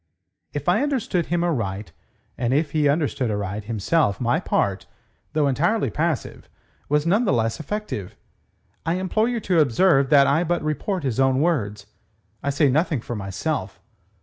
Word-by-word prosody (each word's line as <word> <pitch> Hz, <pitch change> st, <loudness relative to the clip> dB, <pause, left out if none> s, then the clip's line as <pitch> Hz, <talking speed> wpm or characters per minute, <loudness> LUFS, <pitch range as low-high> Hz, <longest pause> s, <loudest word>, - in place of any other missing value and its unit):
"If 145 Hz, -1 st, -5 dB
I 180 Hz, -, +3 dB
understood 255 Hz, -, -1 dB
him 175 Hz, 0 st, 0 dB
aright, 105 Hz, -, -2 dB, 0.4 s
if 135 Hz, +5 st, 0 dB
he 150 Hz, -2 st, +2 dB
understood 140 Hz, -4 st, 0 dB
aright, 105 Hz, 0 st, -3 dB
himself, 110 Hz, -, +1 dB
my 120 Hz, 0 st, +1 dB
part, 100 Hz, -1 st, -1 dB, 0.5 s
though 150 Hz, -2 st, +2 dB
entirely 175 Hz, -, +1 dB
passive, 160 Hz, -2 st, -2 dB, 0.4 s
was 150 Hz, +1 st, +2 dB
none 200 Hz, +8 st, +3 dB
the 195 Hz, -, +2 dB
less 115 Hz, -1 st, 0 dB
effective. 160 Hz, -, -5 dB, 0.7 s
I 165 Hz, -, 0 dB
implore 190 Hz, +5 st, 0 dB
you 240 Hz, -1 st, -1 dB
to 180 Hz, -4 st, +2 dB
observe 140 Hz, 0 st, +3 dB
that 140 Hz, -2 st, +6 dB
I 145 Hz, +5 st, +2 dB
but 175 Hz, -1 st, -1 dB
report 155 Hz, +4 st, -2 dB
his 130 Hz, -3 st, -2 dB
own 135 Hz, 0 st, +3 dB
words. 105 Hz, -11 st, 0 dB, 0.6 s
I 140 Hz, -, -2 dB
say 145 Hz, +1 st, +3 dB
nothing 150 Hz, -1 st, +1 dB
for 120 Hz, -, -5 dB
myself." 100 Hz, -, -3 dB
145 Hz, 155 wpm, -23 LUFS, 115-170 Hz, 0.7 s, that